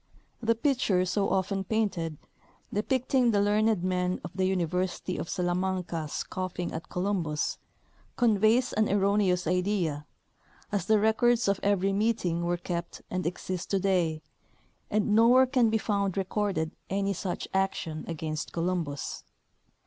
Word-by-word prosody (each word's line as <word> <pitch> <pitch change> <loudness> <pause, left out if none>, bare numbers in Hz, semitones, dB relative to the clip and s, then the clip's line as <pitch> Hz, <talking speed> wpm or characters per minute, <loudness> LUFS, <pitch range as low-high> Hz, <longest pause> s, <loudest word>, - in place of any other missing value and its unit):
The 230 0 +2
picture 225 -8 +2
so 195 +2 0
often 195 +1 0
painted, 190 -7 -1 0.6
depicting 255 +3 +2
the 205 -3 +3
learned 210 -1 +2
men 180 0 0
of - - -6
the 185 0 0
Uni 185 -2 +1
versity 180 +1 -2
of - - -5
Salamanca 180 -2 -1
scoffing 180 +3 -4
at 160 - -6
Columbus, 180 -5 -1 0.6
conveys 230 +1 +3
an 215 0 +2
erro 200 0 +2
neous 185 -3 +2
idea, 180 -4 0 0.6
as 200 -4 -1
the 220 - +5
records 225 +2 +3
of 200 -1 +2
every 195 -1 +2
meeting 200 -5 0
Avere 175 0 -1
kept 170 -1 -4
and 185 -2 -1
exist 180 0 -4
to 195 - +1
day, 175 -5 +1 0.7
and 210 0 +1
nowhere 240 +4 +6
can 250 -3 +3
be 220 - +2
found 200 -3 -1
recorded 190 -4 -1 0.2
any 200 +1 0
such 180 0 -4
action 190 -5 -1
against 155 -2 -4
Columbus. 165 -5 -2
190 Hz, 140 wpm, -28 LUFS, 175-210 Hz, 0.7 s, nowhere